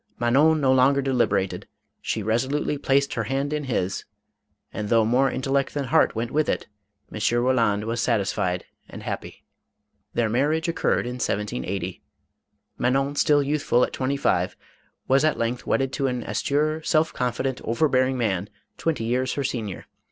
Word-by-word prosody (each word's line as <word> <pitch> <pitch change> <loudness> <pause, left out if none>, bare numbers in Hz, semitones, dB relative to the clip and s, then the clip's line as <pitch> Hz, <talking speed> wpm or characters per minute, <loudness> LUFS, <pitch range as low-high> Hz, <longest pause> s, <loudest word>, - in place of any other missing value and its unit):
Manon 140 +7 +4
no 135 -2 +3
longer 130 +2 +4
deliberated; 105 -8 0 0.3
she 110 - -2
resolutely 130 +7 0
placed 140 0 +2
her - - -2
hand 140 +2 -1
in 150 -1 -2
his, 95 -7 -1 0.7
and 105 -1 -4
though 115 -1 +4
more 130 +4 +3
intellect 135 +2 -1
than 145 - 0
heart 125 - +3
went 115 +2 -2
with 155 0 +1
it, - - -1 0.5
M. - - -5 0.2
Roland 115 -5 +2
was 115 +1 -2
satisfied 95 -6 0 0.2
and - - -9
happy. - - -6 0.7
Their 120 -1 +2
marriage 145 +8 +1
occurred 170 - 0
in 125 +1 -4
1780. 95 - -3 0.8
Manon, 135 +3 +1
still 145 0 +3
youthful 140 -4 +2
at - - -1
twenty 135 +1 -1
five, 90 -9 0 0.5
was 135 +2 +4
at 155 -1 +2
length 115 +1 -2
wedded 135 0 +1
to 135 -2 0
an 125 -2 -2
austere, 155 +2 0
self 155 0 +1
confident, 125 +1 -2
over 115 +8 +1
bearing 130 -1 +2
man, 100 -4 -1 0.3
twenty 160 -8 -1
years 125 +3 0
her 140 - -2
senior. 110 -7 -4
130 Hz, 160 wpm, -24 LUFS, 115-140 Hz, 0.8 s, Manon